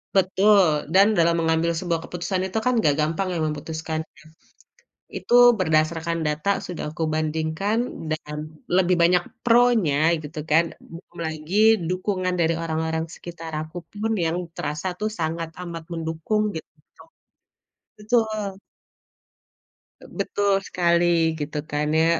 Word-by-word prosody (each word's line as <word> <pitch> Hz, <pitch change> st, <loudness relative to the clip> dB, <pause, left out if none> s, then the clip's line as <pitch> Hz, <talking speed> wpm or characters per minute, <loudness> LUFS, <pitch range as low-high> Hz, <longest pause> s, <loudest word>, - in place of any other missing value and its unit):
Betul, 190 Hz, -5 st, +4 dB
dan 195 Hz, +2 st, +7 dB
dalam 170 Hz, 0 st, +4 dB
mengambil 165 Hz, +1 st, +1 dB
sebuah 170 Hz, -1 st, -1 dB
keputusan 185 Hz, +2 st, -2 dB
itu 190 Hz, -, -4 dB
kan 250 Hz, -, +2 dB
gak 145 Hz, -7 st, +3 dB
gampang 160 Hz, +5 st, 0 dB
ya 170 Hz, -, -2 dB
memutuskannya. 160 Hz, +1 st, -5 dB, 0.9 s
Itu -, -, -3 dB, 0.3 s
berdasarkan 165 Hz, 0 st, +1 dB
data 150 Hz, +4 st, -1 dB
sudah 160 Hz, -3 st, -6 dB
aku 165 Hz, -, -3 dB
bandingkan 160 Hz, +6 st, -1 dB, 0.3 s
dan 150 Hz, -1 st, -4 dB, 0.4 s
lebih 180 Hz, -1 st, +3 dB
banyak 175 Hz, +1 st, +4 dB, 0.2 s
pro-nya, 220 Hz, -11 st, +4 dB
gitu 150 Hz, +1 st, -7 dB
kan. 160 Hz, +2 st, +4 dB
Belum 170 Hz, +1 st, -14 dB
lagi 160 Hz, +4 st, -5 dB, 0.3 s
dukungan 185 Hz, 0 st, -1 dB
dari 165 Hz, -1 st, +2 dB
orang-orang 160 Hz, 0 st, -2 dB
sekitar 165 Hz, -1 st, -9 dB
aku 160 Hz, +3 st, -8 dB
pun 215 Hz, +2 st, -3 dB
yang 165 Hz, +2 st, 0 dB, 0.2 s
terasa 150 Hz, +5 st, -3 dB
tuh 215 Hz, 0 st, -1 dB
sangat 165 Hz, +1 st, -2 dB
amat 170 Hz, -2 st, -6 dB
mendukung 165 Hz, +6 st, -1 dB
gitu. 160 Hz, -, -7 dB, 1.3 s
Betul. 215 Hz, -3 st, -1 dB, 1.6 s
Betul 200 Hz, -1 st, +1 dB
sekali 170 Hz, -1 st, +2 dB, 0.3 s
gitu 150 Hz, +1 st, -4 dB
kan 150 Hz, 0 st, 0 dB
ya. 160 Hz, -, +4 dB
165 Hz, 120 wpm, -23 LUFS, 160-190 Hz, 1.6 s, dan